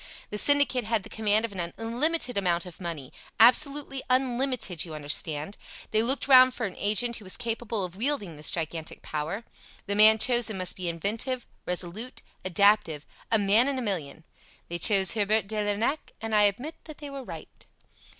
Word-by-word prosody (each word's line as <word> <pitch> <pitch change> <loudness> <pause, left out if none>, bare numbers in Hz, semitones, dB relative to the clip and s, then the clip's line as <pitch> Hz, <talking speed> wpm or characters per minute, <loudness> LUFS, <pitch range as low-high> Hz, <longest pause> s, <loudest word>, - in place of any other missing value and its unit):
The 210 - -1
syndicate 285 -2 +5
had 220 -2 -1
the - - -13
command 215 0 +1
of 230 - -7
an 175 -3 -5
unlimited 245 +4 -1
amount 175 -3 0
of 180 0 -12
money 165 -7 -6 0.3
absolutely 275 +3 +4
unlimited, 255 - 0
you 160 -3 -8
understand. 150 +4 -2 0.3
They 220 - +2
looked 260 +5 -1
round 255 -1 +7
for 240 - -2
an 190 - -6
agent 225 +3 +1
who 215 - -12
was 185 - -2
capable 230 -4 -3
of 180 0 -10
wielding 215 - -2
this 150 +1 -3
gigantic 160 -1 -4
power. 155 +9 -4 0.4
The 200 - -2
man 215 +1 +7
chosen 240 -2 +2
must 185 -2 +1
be 180 -2 -4
inventive, 225 - -2 0.2
resolute, 180 +7 -3 0.2
adaptive 185 -5 +2 0.3
a 225 - +5
man 210 +5 +4
in 280 -1 -1
a - - -2
million. 165 -7 -4 0.5
They 170 0 -4
chose 195 0 +4
Herbert 215 -1 +1
de 215 +2 -5
Lernac, 210 +9 -2
and 225 0 -5
I 210 -1 +5
admit 245 +11 -2
that 310 -2 -10
they 290 -2 -9
were 275 -1 -7
right. - - -11
215 Hz, 180 wpm, -27 LUFS, 180-245 Hz, 0.5 s, round